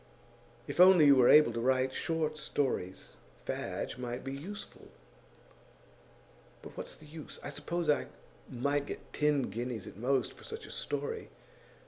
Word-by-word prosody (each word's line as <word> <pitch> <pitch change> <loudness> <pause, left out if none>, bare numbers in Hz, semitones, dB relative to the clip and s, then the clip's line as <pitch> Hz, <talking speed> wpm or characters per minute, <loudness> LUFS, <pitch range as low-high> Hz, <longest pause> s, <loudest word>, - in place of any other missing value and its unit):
'If - - -6
only 180 -3 +8
you 140 -1 +8
were 125 -2 +6
able 150 -6 +7
to 115 - -2
write 130 +2 +2
short 160 -1 -1
stories, 130 -11 -2 0.3
Fadge 125 - -4
might 125 -1 -4
be 135 - -4
useful.' 185 +10 -8 1.8
'But - - -11
what's - - -4
the 155 - -14
use? 155 0 -10
I 145 - -5
suppose 170 +3 -3
I 150 - +2 0.4
might 140 +3 -1
get - - -8
ten 150 -2 +2
guineas, 120 -1 -4
at - - -10
most, 130 +2 0
for - - -16
such 445 +1 -7
a - - -11
story. 455 -1 -4
140 Hz, 150 wpm, -32 LUFS, 125-155 Hz, 1.8 s, only